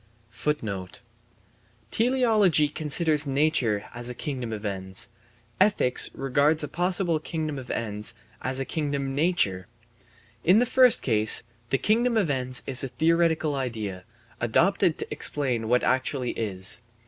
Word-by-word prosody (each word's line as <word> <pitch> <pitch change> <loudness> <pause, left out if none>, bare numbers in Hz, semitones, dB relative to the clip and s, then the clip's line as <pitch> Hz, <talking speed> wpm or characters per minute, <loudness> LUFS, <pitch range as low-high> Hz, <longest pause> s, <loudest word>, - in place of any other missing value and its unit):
* 115 0 -8
Teleology 220 - +3
considers 150 0 +1
nature 135 -7 +1
as 120 0 -6
a 125 - -6
kingdom 130 -6 -4
of 110 -1 -6
ends; 95 -2 -4 0.5
ethics 160 -11 +3
regards 140 +4 +1
a - - -2
possible 175 +1 0
kingdom 155 -2 -4
of 125 - -10
ends 105 -2 -3 0.3
as 130 0 -1
a 135 - -2
kingdom 140 -3 -2
nature. 140 - +1 0.8
In 185 +4 +5
the 245 - +4
first 255 0 +4
case, 110 -3 +4 0.3
the 135 - +2
kingdom 230 - +1
of 185 -9 +2
ends 130 -1 -1
is 130 -1 0
a - - -1
theoretical 160 +3 +1
idea, 110 -9 -4 0.4
adopted 170 - +2
to - - -5
explain 125 -6 -1
what 125 +1 +3
actually 130 -1 0
is. 100 0 -2
135 Hz, 135 wpm, -26 LUFS, 115-160 Hz, 0.8 s, In